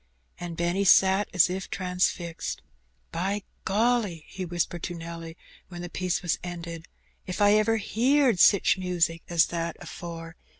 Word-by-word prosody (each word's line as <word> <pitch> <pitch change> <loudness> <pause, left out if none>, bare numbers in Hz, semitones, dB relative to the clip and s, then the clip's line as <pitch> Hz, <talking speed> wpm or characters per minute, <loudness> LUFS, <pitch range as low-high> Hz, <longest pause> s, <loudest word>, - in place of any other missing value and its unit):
And 175 -2 -6
Benny 175 +3 0
sat 190 +1 +5
as 180 -2 +5
if 185 +2 -4
transfixed. 180 -2 -2 0.2
" - - -42
By 200 +2 -1 0.2
golly! 210 -5 +1
" - - -25
he 190 - -3
whispered 175 0 -2
to 175 - -4
Nelly, 165 0 -8 0.3
when 175 -1 -8
the 175 - -7
piece 180 0 -1
was 175 - 0
ended, 170 -1 -7 0.4
"if 185 - -4
I 205 0 +5
ever 215 +1 +3
heerd 245 +1 +2
sich 195 0 +5
music 170 -3 0
as 170 -1 +4
that 170 -1 -2
afore. 165 -1 -8
175 Hz, 160 wpm, -27 LUFS, 170-195 Hz, 0.4 s, sat